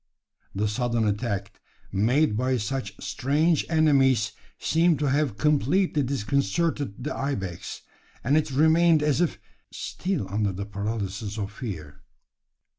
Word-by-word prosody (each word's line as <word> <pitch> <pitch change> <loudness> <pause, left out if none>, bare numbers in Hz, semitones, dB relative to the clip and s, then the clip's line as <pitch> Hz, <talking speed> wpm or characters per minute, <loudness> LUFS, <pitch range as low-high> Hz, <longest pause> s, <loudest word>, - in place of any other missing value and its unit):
The 105 +2 +1
sudden 115 +1 0
attack 105 0 -3 0.3
made 115 +6 +2
by 130 +3 +1
such 105 -2 -3
strange 140 - +1
enemies 140 -7 +3 0.3
seemed 165 0 +2
to 145 -3 0
have 140 -7 +1
completely 150 - +2
disconcerted 140 0 -1
the - - -3
ibex; 100 -11 -4 0.4
and 140 +5 +2
it 155 -1 +2
remained 160 +3 +4
as 150 +2 +2
if 175 - +1 0.3
still 185 - -3
under 100 0 -1
the 100 +2 -5
paralysis 100 0 -4
of 100 -1 -3
fear. 90 - -7
130 Hz, 120 wpm, -26 LUFS, 105-150 Hz, 0.4 s, remained